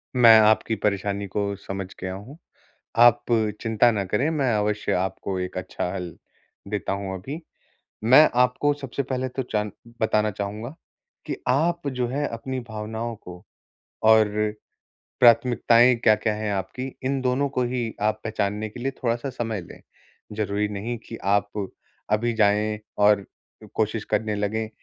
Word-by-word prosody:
मैं 115 -3 +8
आपकी 110 +1 +3
परेशानी 100 0 0
को 100 +1 -2
समझ 95 -1 -5
गया 95 0 -4
हूँ, 105 +10 -10 0.6
आप 120 0 +6 0.4
चिंता 115 +1 +3
ना 100 -3 -1
करें 105 +10 0
मैं 140 -6 +1
अवश्य 105 0 0
आपको 95 +1 -2
एक 90 0 -5
अच्छा 90 -1 -4
हल 90 -2 -4 0.6
देता 105 -1 -2
हूँ 100 -1 -3
अभी। 135 - -6 0.6
मैं 135 +7 +8
आपको 125 +4 +2
सबसे 140 -1 -4
पहले 130 -1 -2
तो 130 +1 -3
जान 105 -1 -1 0.3
बताना 110 -1 +2
चाहूँगा, 105 +6 -5 0.5
कि - - -3
आप 160 +4 +1
जो 125 - +1
है 145 +4 -1
अपनी 130 +3 -4
भावनाओं 110 +2 -4
को 90 -3 -12 0.6
और 110 0 +7 0.9
प्राथमिकताएँ 120 0 +5
क्या-क्या 110 -2 +2
है 105 -1 -2
आपकी? 125 +7 -4
इन 135 +1 0
दोनों 130 +2 +1
को 125 -2 -1
ही 120 -2 -2
आप 110 +1 +1
पहचानने 110 -1 -2
के 120 - -11
लिए 135 +3 -1
थोड़ा-सा 120 +3 0
समय 115 -5 -3
लें। 85 - -13 0.6
ज़रूरी 105 0 0
नहीं 105 +4 -4
कि 115 - -7
आप 100 0 0 0.4
अभी 115 +3 +2
जाएँ 105 0 +2 0.2
और 105 -1 +4 0.4
अ, - - -10
कोशिश 110 0 -1
करने 105 0 0
लगे 105 +2 -1
110 Hz, 150 wpm, -24 LUFS, 100-125 Hz, 0.9 s, मैं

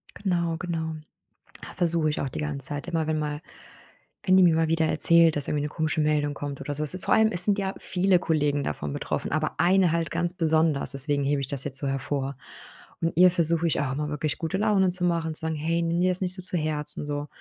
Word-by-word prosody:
Genau, 170 -4 -1
genau. 165 -2 -4 0.7
Ah, - - -9
versuche 170 -3 +1
ich 150 - -3
auch 135 - -3
die - - -7
ganze 145 -3 +1
Zeit 145 +2 -6
immer, 165 -3 -2
wenn 155 -1 -1
mal 150 0 -4 0.8
wenn 185 -1 +4
die 190 - +6
mir 170 -2 +4
mal 160 0 +1
wieder 165 0 +1
erzählt, 170 0 +5
dass 145 - -2
irgendwie 150 - -1
'ne 150 - -3
komische 155 0 -1
Meldung 150 -1 0
kommt 140 -1 -6
oder 145 +1 -4
so. 145 - -5
Es 150 - +3
ist 185 - -9
vor - - +2
allem 220 0 +3
es 175 -2 +8
sind 205 -1 +2
ja 195 0 -3
viele 185 0 +1
Kollegen 150 -4 0
davon 75 - -4
betroffen, - - -4
aber 155 +1 -2
eine 180 0 +3
halt 165 -3 -1
ganz 170 +1 +1
besonders, 160 -4 +1
deswegen 140 +1 0
hebe 140 0 0
ich 135 - -4
das 135 -1 -4
jetzt 140 -1 -4
so 140 - -3
hervor. 135 0 -3 0.7
Und 165 - -1
ihr 180 0 +7
versuche 170 -1 +1
ich 155 - 0
auch 135 -2 -2
immer, 150 +1 -3
wirklich 150 0 -3
gute 165 +3 -2
Laune 200 -2 +2
zu 180 0 -3
machen, 165 -2 -1
zu - - -6
sagen: 160 0 -2
„Hey, 165 +3 -1
nimm 170 +1 -1
dir 185 - +3
das 180 - -1
nicht 180 -1 -1
so 185 - -8
zu 180 -1 -1
Herzen”, 150 -2 -1
so. 145 0 -4
160 Hz, 245 wpm, -25 LUFS, 145-175 Hz, 0.8 s, es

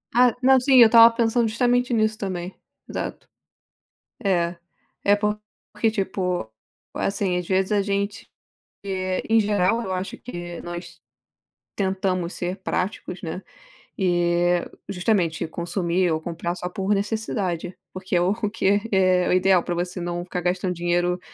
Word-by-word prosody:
Ah, 245 -1 +5
não, 265 0 +6
sim, 265 +1 +3
eu 240 - +10
estava 230 +1 +8
pensando 230 0 +2
justamente 245 +2 +1
nisso 215 -1 +1
também. 185 -2 -4 0.3
Exato. - - -5 1.0
É, 175 -3 +1 0.5
é 205 0 +5
porque, 210 +1 -2
tipo, 185 - -2 0.5
assim, 195 -2 -1
às 180 -1 -3
vezes 190 +2 +1
a 205 -1 +3
gente, 200 0 -3 0.5
eh, 185 -1 -2
em 225 0 +5
geral, 210 +2 +1
eu 190 - -4
acho 185 +1 -4
que 175 -7 -7
nós 175 0 -8 0.8
tentamos 190 -2 -1
ser 180 +2 -3
práticos, 190 -1 -3
né. 170 +1 -5 0.6
E 175 -1 +2 0.3
justamente 180 -5 0
consumir 175 +1 -1
ou 160 0 -1
comprar 170 +1 -4
só 180 0 -5
por 195 +2 -1
necessidade, 195 -4 -2 0.2
porque 185 0 -4
é 175 - +4
o 185 +3 +2 0.2
que 205 -1 +1
é 185 -2 +3
o - - +2
ideal 185 -1 +4
para 175 - -3
você 180 +1 -3
não 175 0 -3
ficar 180 0 -4
gastando 180 +1 -1
dinheiro 175 +1 0
185 Hz, 145 wpm, -23 LUFS, 175-210 Hz, 1.0 s, eu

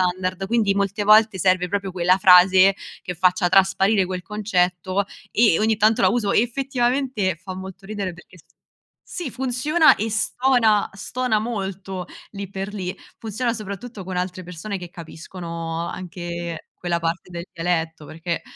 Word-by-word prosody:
standard, 185 +1 -3
quindi 220 -3 +2
molte 200 +1 0
volte 215 -2 +5
serve 185 -1 +2
proprio 200 0 -2
quella 180 +1 +3
frase 185 +1 +7 0.3
che 180 - -5
faccia 180 +1 +2
trasparire 195 +2 +3
quel 185 0 -4
concetto 185 -1 0 0.3
e 215 -7 +4
ogni 220 0 +2
tanto 220 +3 +3
la - - +5
uso, 220 -3 0
effettivamente 245 - 0
fa 185 -1 -7
molto 190 +1 -9
ridere 200 -2 -4
perché 175 +2 -17
s - - -19 0.6
sì, 345 -7 -5
funziona 280 +6 +3
e 220 +2 -2
stona, 225 -1 +2
stona 225 +3 -1
molto 195 -4 -4 0.2
lì 200 -2 -7
per 195 +1 -5
lì. 185 -3 -4 0.2
Funziona 230 +2 -2
soprattutto 215 0 -7
con 185 0 -5
altre 180 0 -3
persone 180 +4 -6
che 175 -1 -8
capiscono 165 0 -6
anche 175 -2 -6
quella 175 -1 -2
parte 170 +2 -3
del 170 0 -6
dialetto, 165 -2 -2
perché 165 +2 -4
190 Hz, 150 wpm, -22 LUFS, 180-215 Hz, 0.6 s, frase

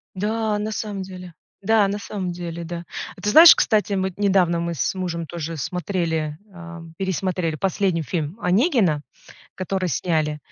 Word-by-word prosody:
Да, 215 +2 -1
на 215 +1 -3
самом 210 -2 -4
деле. 185 -2 -10 0.3
Да, 210 0 +3
на 200 +1 -3
самом 190 -3 -4
деле, 170 -1 -6
да. 170 +1 -6 0.3
А - - -14
ты 210 - 0
знаешь, 320 +9 +10
кстати, 210 -3 +1
мы 190 -1 0
недавно, 190 -4 +2
мы 170 0 -2
с 160 +4 -1
мужем 170 -3 -3
тоже 165 -1 -5
смотрели, 160 -1 -2
э, 170 -2 -10 0.2
пересмотрели 185 -3 -1
последний 185 0 0
фильм 160 +2 -3
"Онегина", 190 - +2 0.5
который 185 0 -2
сняли, 155 0 0
180 Hz, 155 wpm, -22 LUFS, 170-200 Hz, 0.5 s, знаешь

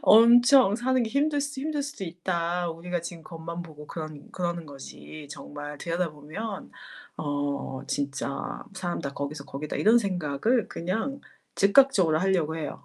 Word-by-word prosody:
엄청 240 0 +7
사는 255 +1 +2
게 225 - -2
힘들 290 +2 +2
수 285 -1 -4
힘들 295 0 -1
수도 275 -8 -5
있다. 175 0 -1
우리가 175 +2 -3
지금 170 -1 -7
겉만 165 +1 -6
보고 150 -3 -11
그러는 155 -3 -7
그러는 175 -2 -2
거지 145 +2 -10
정말 145 0 -7
들여다보면 170 +4 -4 0.5
어 145 -2 -2
진짜 140 -1 -3
사람 175 -2 -3
다 140 - -4
거기서 140 +1 -4
거기다.' 145 +2 -4
이런 225 +3 +6
생각을 195 - 0
그냥 225 +11 -2 0.4
즉각적으로 200 - +5
하려고 175 -4 +1
해요. 150 -3 -5
175 Hz, 315 characters per minute, -27 LUFS, 150-225 Hz, 0.5 s, 엄청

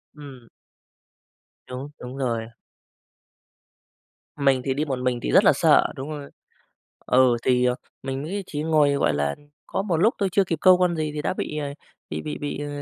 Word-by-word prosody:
Ừm. 135 -5 -12 1.2
Đúng, 130 +3 -6
đúng 125 +2 -8
rồi. 115 -4 -2 1.9
Mình 135 -3 +3
thì 135 - +1
đi 145 +3 -1
một 135 -4 -3
mình 125 -1 0
thì - - -2
rất - - +6
là - - +6
sợ, - - +4
đúng 135 +3 -6
rồi. 145 -2 -7 0.8
Ừ, 125 -1 +4
thì 125 -1 +3 0.4
mình 135 0 -4
nghĩ 195 +7 -4
chỉ 150 -4 -4
ngồi, 155 -2 +3
gọi 140 - +1
là, 70 0 0 0.3
có - - -2
một 190 -5 0
lúc 210 +10 +3
thôi, 200 -3 +1
chưa 200 - +3
kịp 165 -3 -2
câu 185 -1 +6
con 180 -2 +2
gì 155 -1 -1
thì 150 - -3
đã - - -1
bị, 150 - -4
ờ, 145 - -2 0.4
bị - - -4
bị 150 - -5
bị, 145 -1 -4
ờ, 145 0 -4
145 Hz, 185 wpm, -24 LUFS, 130-155 Hz, 1.9 s, rất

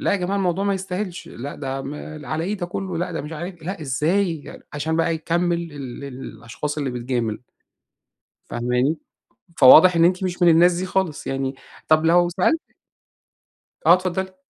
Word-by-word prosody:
لا - - +1
يا - - +3
جماعة 190 +2 -1
الموضوع 190 0 0
ما 200 -1 +1
يستاهلش، 185 -1 -5
لأ 135 +5 -7
ده 135 -1 -4
م 135 +2 -6 0.3
على 155 +5 -2
إيه 205 +4 -2
ده 175 -2 -4
كلّه 180 -1 -4
لأ 180 0 -2
ده 160 - -3
مش 150 +3 -7
عارف 170 +1 -7
لأ 185 +1 -5
إزاي 160 +4 -1
عشان 155 +2 -2
بقى 165 0 +1
يكمِّل 170 0 -1
ال 140 -1 -7
الأشخاص 130 +2 -6
اللي 140 -3 -1
بتجامل. 120 -3 -2 1.1
فاهماني؟ 125 +6 0 0.6
فواضح 165 +7 +8
إن 165 - +5
أنتِ 185 +2 +2
مش 180 0 -2
من 175 - +7
الناس 170 +2 +6
دي 185 +2 -2
خالص 185 -4 -1
يعني، 135 0 -2 0.3
طب 155 0 +4
لو 175 +1 +4
سألتِك 320 - 0 1.1
آه - - +9
إتفضّلي. 185 +1 -2
165 Hz, 170 wpm, -22 LUFS, 140-180 Hz, 1.1 s, آه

